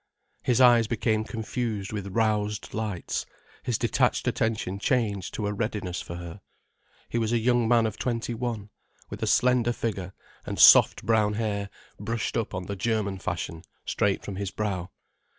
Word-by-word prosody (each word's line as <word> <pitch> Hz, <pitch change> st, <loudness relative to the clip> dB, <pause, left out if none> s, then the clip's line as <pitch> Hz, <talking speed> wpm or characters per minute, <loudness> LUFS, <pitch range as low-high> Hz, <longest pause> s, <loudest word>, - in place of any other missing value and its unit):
His 125 Hz, -1 st, +1 dB
eyes 120 Hz, -3 st, +6 dB
became 110 Hz, -1 st, 0 dB
confused 110 Hz, -2 st, -3 dB
with 100 Hz, -2 st, -4 dB
roused 105 Hz, 0 st, 0 dB
lights, 105 Hz, -5 st, -3 dB, 0.3 s
his -, -, -1 dB
detached -, -, +1 dB
attention 105 Hz, -4 st, -1 dB
changed 105 Hz, -6 st, 0 dB
to 105 Hz, -, -2 dB
a 105 Hz, -, -1 dB
readiness 105 Hz, -4 st, -3 dB
for 85 Hz, -, -7 dB
her. 85 Hz, +3 st, -8 dB, 0.7 s
He 120 Hz, -, -1 dB
was 110 Hz, -1 st, 0 dB
a 120 Hz, -, +3 dB
young 120 Hz, 0 st, +2 dB
man 115 Hz, -1 st, +4 dB
of 110 Hz, -2 st, -3 dB
twenty 120 Hz, -1 st, -2 dB
one, 115 Hz, -3 st, -4 dB, 0.4 s
with -, -, -7 dB
a -, -, 0 dB
slender 125 Hz, -1 st, +3 dB
figure 100 Hz, -6 st, -3 dB, 0.3 s
and -, -, -5 dB
soft -, -, +7 dB
brown 110 Hz, -2 st, +3 dB
hair 105 Hz, -2 st, -2 dB, 0.3 s
brushed 110 Hz, +2 st, -2 dB
up 110 Hz, -4 st, -2 dB
on 90 Hz, -1 st, -4 dB
the 100 Hz, -, -4 dB
German 100 Hz, -2 st, -1 dB
fashion 85 Hz, -2 st, -4 dB, 0.2 s
straight 100 Hz, -1 st, 0 dB
from 95 Hz, -, -5 dB
his 100 Hz, -1 st, -2 dB
brow. 95 Hz, -4 st, -3 dB
110 Hz, 165 wpm, -27 LUFS, 100-115 Hz, 0.7 s, soft